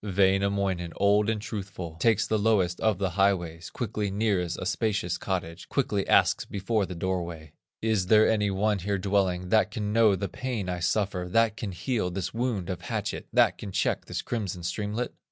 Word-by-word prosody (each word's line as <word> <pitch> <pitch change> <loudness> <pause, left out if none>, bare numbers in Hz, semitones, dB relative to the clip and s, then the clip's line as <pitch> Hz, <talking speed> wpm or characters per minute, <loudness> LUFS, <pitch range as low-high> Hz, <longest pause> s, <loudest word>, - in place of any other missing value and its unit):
Wainamoinen, 95 -2 +1
old 105 +1 +3
and 110 -1 0
truthful, 95 -6 -6
Takes 110 -2 +3
the 110 - 0
lowest 100 -5 +2
of 110 -4 +2
the 95 -1 -1
highways, 85 -4 0
Quickly 105 -4 -3
nears 95 -4 0
a - - -5
spacious 105 -4 -1
cottage, 90 -3 -4
Quickly 105 -8 0
asks - - +4
before 100 0 -1
the 90 - -6
doorway: 85 -3 -3 0.3
"Is 110 -5 +1
there 110 +1 +6
any 105 -2 +2
one 100 +1 +1
here 100 +2 -1
dwelling, 95 -2 0
That 105 -2 +4
can 105 -1 -3
know 110 -3 +5
the 100 +1 -3
pain 115 -3 -4
I 90 0 -2
suffer, 95 0 0
That 115 +2 +3
can 110 -3 -4
heal 95 +2 -1
this 90 0 -4
wound 115 -6 -1
of 90 - -5
hatchet. - - -4
That - - +3
can 100 - -6
check 95 -1 0
this - - -4
crimson 100 -7 -3
streamlet?" 105 +6 -3
100 Hz, 180 wpm, -27 LUFS, 90-110 Hz, 0.3 s, there